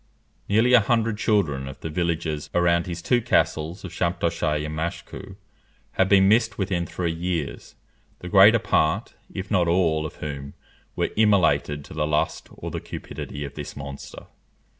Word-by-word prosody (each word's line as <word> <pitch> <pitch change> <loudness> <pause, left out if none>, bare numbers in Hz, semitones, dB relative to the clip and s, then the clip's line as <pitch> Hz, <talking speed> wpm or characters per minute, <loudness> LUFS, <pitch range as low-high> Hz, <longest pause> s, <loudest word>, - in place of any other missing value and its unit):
Nearly 115 +5 +4
a 125 - +9
hundred 115 0 0
children 75 -13 +1
of 65 - -10
the 80 - -4
villagers 80 -2 -2
around 85 0 +2
his 85 -1 -5
two 125 -1 +2
castles 85 -3 0
of 90 - -7
Champtocé 85 -3 -1
and 75 0 -5
Machecoue, 80 +2 -5 0.6
had 95 - +1
been 95 -1 +6
missed 110 +1 +3
within 90 -3 -1
three 85 -2 -2
years, 85 -2 -4 0.4
the 90 - -9
greater 100 +5 +7
part, 80 -7 0 0.2
if 95 +2 -6
not 90 -4 +3
all, 80 -3 +2
of - - -12
whom 70 -2 -6 0.4
were - - -1
immolated 85 -9 +2
to - - -11
the 75 0 -1
lust 75 0 -1
or - - -7
the - - -3
cupidity 70 0 -7
of 70 - -8
this 75 -1 -8
monster. 70 -1 -8
85 Hz, 160 wpm, -24 LUFS, 75-100 Hz, 0.6 s, a